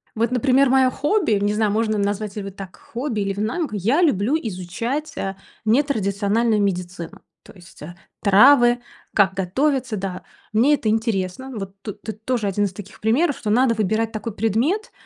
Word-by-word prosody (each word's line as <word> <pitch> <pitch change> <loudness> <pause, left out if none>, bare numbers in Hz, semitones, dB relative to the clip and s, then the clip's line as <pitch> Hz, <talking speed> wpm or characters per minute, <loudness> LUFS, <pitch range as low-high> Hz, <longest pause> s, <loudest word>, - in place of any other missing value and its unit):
Вот, 230 +2 0
например, 260 +2 +3
мое 260 0 +4
хобби, 295 - +1
не 205 0 +1
знаю, 215 -1 +1
можно 215 0 0
назвать 205 0 -2
ли 210 - -4
вы 195 - -6
так 195 -1 -10
хобби 235 -3 -4
или 200 0 -1
в 200 - -7
найме, 245 +10 -1
к - - -13
я 225 - +1
люблю 270 - +2
изучать, 230 - -4
э, 195 0 -3 0.3
нетрадициональную 220 -3 +1
медицину. 180 -3 -3 0.2
То - - -15
есть, 175 -3 -17
э, 165 +4 -9 0.3
травы, 240 +4 +6 0.4
как 195 -2 +4
готовиться, 255 +6 0
да, 190 -1 -5 0.3
мне 245 +7 +4
это 235 -7 0
интересно. 220 +2 -1
Вот 195 -1 -6
тут 210 - -8
ты 220 - -5
тоже 220 0 -2
1 205 +1 +1
из 190 - -4
таких 200 +1 -11
примеров, 270 +7 +1
что 215 - -4
надо 235 +2 +3
выбирать 220 +2 0
такой 215 0 -5
предмет, 230 - 0
215 Hz, 180 wpm, -22 LUFS, 200-255 Hz, 0.4 s, травы